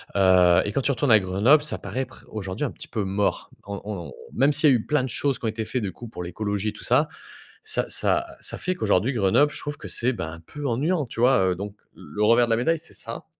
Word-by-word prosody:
Heu 90 -2 +5
et 105 - -2
quand 135 - +1
tu 140 - +1
retournes 135 0 +1
à 110 - +8
Grenoble, 105 +11 +3
ça 150 - -3
paraît 130 +1 -3
pr - - -17
aujourd'hui, 100 +4 -4
un 135 - -3
petit - - -9
peu 110 -3 -2
mort. 100 +1 -1 0.2
On 100 0 -6
on 100 -5 -6 0.2
même 140 +4 +3
s'il 150 - +5
y - - +6
a - - +5
eu 110 - -6
plein 150 -3 +1
de 130 - -3
choses 135 +3 -1
qui - - -6
ont - - +2
été 110 0 -4
faits, 125 +3 -2
du 100 - -2
coup, 120 - -10
pour 110 - -8
l'écologie, 100 +4 -2
tout - - -12
ça, 145 +6 +3 0.5
ça 435 0 0
ça - - +1 0.2
ça - - -4
fait 185 - -1
qu'aujourd'hui, 110 - +1
Grenoble, 115 +7 +3
je - - -6
trouve 145 -1 -5
que - - -9
c'est, 125 +2 0
ben, 85 -7 -5
un 80 - -10
peu 145 - -8
ennuyant, 145 +6 0
tu 115 - -8
vois? 125 +1 +5
Heu, - - -1
donc, 100 +2 -6 0.2
le 105 +8 -4
revers 115 +3 +5
de - - -2
la - - +5
médaille, 160 +7 +1
c'est 165 - -13
ça 115 0 -7
115 Hz, 270 wpm, -24 LUFS, 100-135 Hz, 0.5 s, à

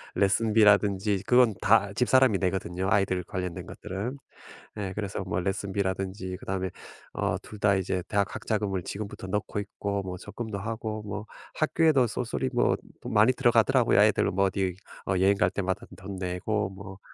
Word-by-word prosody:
레슨비라든지 105 -1 +3
그건 125 -3 +5
다 100 -1 +4
집사람이 125 -2 +4
내거든요 95 0 -1
아이들 95 -4 +2
관련된 90 -3 -4
것들은. 110 +9 -5 0.6
예 100 -2 -3
그래서 100 -1 -4
뭐 90 -1 -2
레슨비라든지 95 -1 -2
그다음에 95 -1 -3 0.4
어 - - -1
2 105 - -11
다 100 -1 +4
이제 95 -1 -1
대학 100 -1 0
학자금을 100 -4 -2
지금부터 100 0 -6
넣고 105 +1 -2
있고 100 0 -3
뭐 90 -1 -5
적금도 105 +2 -6
하고 110 0 -4
뭐 105 0 -5 0.3
학교에도 155 -4 +3
쏠쏠히 125 +3 -2
뭐 120 - +3 0.3
돈 - - -6
많이 110 +4 +6
들어가더라고요. 120 -1 +3
아이들 105 0 +4
뭐 100 +1 +2
어디 95 -1 -1 0.3
어 95 - +1
여행 95 +2 +4
갈 90 - +3
때마다 95 0 -2
돈 95 0 -7
내고 95 +3 -2
뭐 95 0 -10
100 Hz, 355 characters per minute, -27 LUFS, 95-110 Hz, 0.6 s, 많이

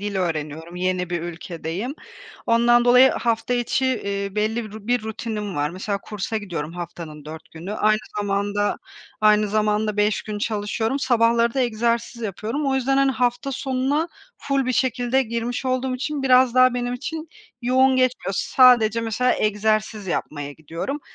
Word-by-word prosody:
dil 205 -1 -3
öğreniyorum, 160 -1 -3
yeni 180 -1 -1
bir 175 -2 -2
ülkedeyim. 175 - -5 0.5
Ondan 240 +1 +4
dolayı 250 +2 +7
hafta 230 +1 -1
içi, 245 +2 0
eee, 200 -5 -2
belli 220 +2 0
bir 215 0 -10
bir 245 -1 +1
rutinim 215 -2 -4
var. 145 +1 0
Mesela 200 +2 -3
kursa 210 +2 -4
gidiyorum 170 -7 -4
haftanın 170 -3 -8
4 155 +1 -10
günü, 170 +5 -7
aynı 215 0 +3 0.2
zamanda 205 0 0 0.4
aynı 210 0 +4
zamanda 215 0 0
5 210 0 +1
gün 210 -1 -5
çalışıyorum. 220 +4 -1
Sabahları 235 -2 +2
da 265 - +1
egzersiz 235 0 -1
yapıyorum. 225 +8 -3
O 270 - +1
yüzden, 265 +1 +1
hani, 275 0 +4
hafta 250 +2 -1
sonuna 270 +4 -1 0.3
full 275 -2 -1
bir 255 - +1
şekilde 250 +1 +1
girmiş 235 +1 -3
olduğum 255 0 0
için 285 +2 -3
biraz 255 -2 +5
daha 255 -1 +5
benim 245 0 -2
için 315 +5 -6 0.3
yoğun 260 +1 +4
geçmiyor. 255 -7 +1
Sadece 240 -4 +5
mesela 230 +3 +1
egzersiz 215 0 0
yapmaya 145 -4 -3
gidiyorum 165 - -5
220 Hz, 155 wpm, -23 LUFS, 200-250 Hz, 0.5 s, dolayı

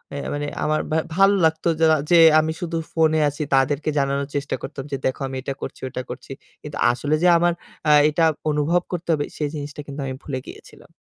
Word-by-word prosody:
এ - - -4 0.2
মানে 145 0 -3 0.2
আমার 155 0 +1
বা 155 - +2 0.2
ভালো 195 +1 +5
লাগতো 160 +1 0
যা - - +6 0.3
যে 175 - +7 0.2
আমি 155 +1 0
শুধু 170 -1 -3 0.2
ফোনে 160 -1 +3
আছি 145 +2 -7
তাদেরকে 140 +3 +1
জানানোর 140 0 0
চেষ্টা 145 0 -2
করতাম 135 - -6
যে 140 - -1
দেখো 130 +2 -1
আমি 135 - -6
এটা 135 +1 -4
করছি, - - -7
ওটা 130 - -5
করছি। - - -9 0.3
কিন্তু - - -7
আসলে 145 +5 -1
যে - - +5
আমার 175 0 +2 0.4
আ - - +6 0.2
এটা 165 +2 +2 0.3
অনুভব 155 +4 +1
করতে 175 -1 -5
হবে 145 -2 0
সেই 150 -2 -1
জিনিসটা 145 0 -6
কিন্তু 140 +1 -7
আমি 130 - -4
ভুলে 130 -3 -4
গিয়েছিলাম। - - -14
150 Hz, 205 wpm, -22 LUFS, 140-160 Hz, 0.4 s, যে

